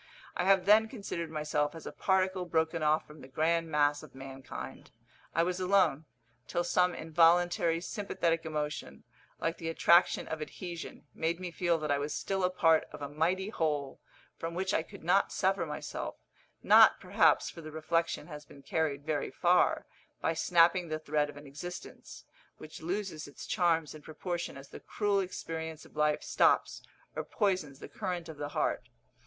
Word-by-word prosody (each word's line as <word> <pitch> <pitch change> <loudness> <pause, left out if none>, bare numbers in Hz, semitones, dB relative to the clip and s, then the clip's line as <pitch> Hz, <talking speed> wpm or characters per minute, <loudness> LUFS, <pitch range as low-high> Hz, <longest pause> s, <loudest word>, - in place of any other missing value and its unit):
I 180 - 0
have 190 -1 +4
then 215 +2 +6
considered 200 -8 -5
myself 150 -1 -1
as 165 - -10
a - - -5
particle 190 -1 +1
broken 160 -1 0
off 155 +1 +2
from 150 0 -14
the - - -11
grand 165 +4 0
mass 145 -1 +2
of - - -14
mankind; 135 -1 -8 0.5
I 165 - +4
was 180 +1 -1
alone, 180 -5 +2 0.4
till 175 - -1
some 180 0 +2
involuntary 165 +1 +3
sympathetic 175 -4 -1
emotion, 150 - -4 0.4
like 165 0 -2
the 165 - -3
attraction 170 +2 +4
of 160 -1 -4
adhesion, 170 +2 -7
made 165 +2 -1
me 180 -1 -5
feel 170 -1 +1
that 155 -2 -2
I 140 - +2
was 145 0 -3
still 195 -1 -2
a 180 - +3
part 165 -3 +3
of 150 -1 -8
a 140 - -4
mighty 175 +7 0
whole, 150 -8 -2 0.4
from 165 +1 -4
which 190 +2 -1
I - - +2
could 160 - -13
not 185 +4 +3
sever 190 -3 +1
myself 150 0 -5 0.5
not, - - +7
perhaps, - - +3
for 165 - -10
the 155 - -8
reflection 165 +2 -1
has 150 -3 -9
been 140 -1 -16
carried 145 -2 -1
very 155 -2 -1
far, - - +2 0.3
by 165 - 0
snapping 175 +1 +3
the 155 -1 -2
thread 150 -1 0
of 145 - -10
an 145 - -11
existence, 155 +6 -9 0.3
which 155 - -11
loses 180 -2 -3
its 145 - -10
charms 165 -4 +1
in 155 - -11
proportion 170 +1 -5
as 135 0 -12
the - - -10
cruel 205 -2 0
experience 160 -4 -5
of - - -19
life 150 0 +1
stops - - +2 0.3
or - - -2
poisons 185 -10 -1
the - - -9
current 180 -5 -4
of 160 -2 -9
the 145 0 -4
heart. - - -1
165 Hz, 175 wpm, -31 LUFS, 150-180 Hz, 0.5 s, not